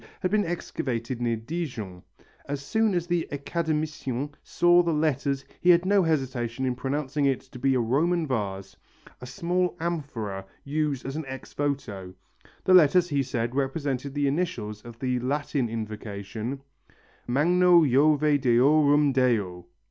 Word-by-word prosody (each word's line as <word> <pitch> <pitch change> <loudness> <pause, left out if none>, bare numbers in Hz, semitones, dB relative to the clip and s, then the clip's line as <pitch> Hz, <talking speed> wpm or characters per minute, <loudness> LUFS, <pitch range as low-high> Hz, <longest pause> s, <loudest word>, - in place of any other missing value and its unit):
had 185 - 0
been 210 0 +3
excavated 130 -7 -3
near 120 -1 +1
Dijon. 115 - -5 0.5
As 140 0 -4
soon 220 +2 +1
as 175 -1 0
the 175 -1 -1
Academicien 145 -3 -2
saw 175 0 +4
the 170 -1 0
letters 140 -3 0 0.2
he 180 - +3
had 175 0 +6
no 200 +1 +4
hesitation 130 -6 -1
in 130 - +1
pronouncing 140 +2 -2
it 135 -2 +1
to 125 - -13
be 135 +1 +2
a - - +2
Roman 160 +9 +1
vase, 100 -7 -3 0.5
a 125 - -8
small 175 +7 -1
amphora 135 - -3 0.2
used 145 -2 -2
as 135 +1 -4
an 160 - -4
ex 135 0 -8
voto. 105 -11 -3 0.5
The 185 - +3
letters, 175 +1 +6
he 140 -2 +1
said, 120 -2 -2
represented 140 0 -2
the 145 0 +1
initials 125 -9 -2
of 120 0 -11
the 125 0 -1
Latin 140 -1 -1
invocation: 110 +3 -5 0.7
MAGNO 170 +6 +4
JOVE 145 +2 +3
DEORUM 145 +4 +4
DEO. 105 -9 0
140 Hz, 145 wpm, -26 LUFS, 120-160 Hz, 0.7 s, had